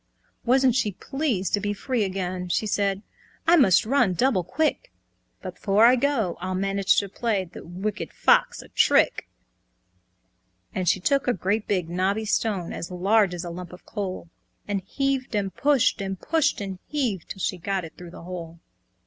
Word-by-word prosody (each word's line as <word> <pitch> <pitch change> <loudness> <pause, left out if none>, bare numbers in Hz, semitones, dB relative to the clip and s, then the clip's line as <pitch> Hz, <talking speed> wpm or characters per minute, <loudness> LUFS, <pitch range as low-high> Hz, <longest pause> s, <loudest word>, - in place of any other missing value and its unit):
Wasn't 260 +1 +4
she 215 -5 0
pleased 255 - -2
to 205 - +3
be 205 0 -1
free 240 +2 -1
again! 185 -2 -3
She 215 - 0
said, 200 -1 0 0.4
"I 340 +1 +6
must 215 - +5
run 240 -6 +2
double 240 -4 +2
quick; 310 - -1 0.5
But - - -5
before 205 +2 +3
I 245 +2 +7
go 240 -9 0
I'll 185 +1 -2
manage 195 +1 +1
to 200 - +2
play, 200 -1 -1
The 175 - -11
Wicked 190 +4 -4
Old - - -25
Fox - - +3
a - - -17
trick." - - +3 1.4
And 185 -3 0
she 180 - +2
took 275 +9 +1
a 245 - +3
great 205 +3 -1
big 185 -5 0
knobby 190 +5 0
stone, 205 -5 -1
As 170 - -5
large 190 +1 +2
as 175 - -5
a 175 - -5
lump 175 0 -8
of 180 - -13
coal, 190 -4 -5 0.4
And 200 -1 -1
heaved 265 +4 -2
and 195 -3 -1
pushed, 275 -3 +2
and 195 -1 -4
pushed 315 -8 +1
and 195 -2 -5
heaved, 245 - -2
'Till 190 - -7
she 185 -1 -2
got 190 0 -2
it 160 - -11
through 175 -1 -10
the 170 - -11
hole. 170 -2 -7
200 Hz, 185 wpm, -25 LUFS, 185-240 Hz, 1.4 s, I